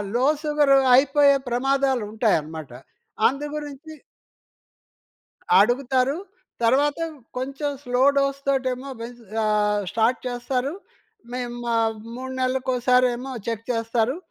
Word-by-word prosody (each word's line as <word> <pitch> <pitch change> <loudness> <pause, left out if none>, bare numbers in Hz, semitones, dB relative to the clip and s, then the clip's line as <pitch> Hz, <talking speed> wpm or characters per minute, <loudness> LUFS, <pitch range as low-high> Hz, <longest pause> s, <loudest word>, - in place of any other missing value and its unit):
Low 250 +2 +2 0.2
sugar 295 -2 +3 0.2
అయిపోయే 280 +1 +5
ప్రమాదాలుంటాయన్నమాట. 225 - 0 0.6
అందు 280 +3 -3
గురించి 295 +1 -7 1.7
అడుగుతారు. 255 +3 +2 0.5
తర్వాత 280 +6 +3 0.4
కొంచెం 275 +3 -3
స్లో 250 0 0
డోస్ 275 0 +1
తోటేమో 260 0 -1
పే 230 - -4 0.4
ఆహ్, 210 -1 +2
స్టార్ట్ 230 +2 +1
చేస్తారు. 250 +2 -2 0.6
మేము 245 -1 -4 0.6
3 260 +1 -6
నెల్లకోసారేమో 255 0 +1
చెక్ 230 -1 -3
చేస్తారు. 230 +2 0
255 Hz, 90 wpm, -23 LUFS, 240-275 Hz, 1.7 s, అయిపోయే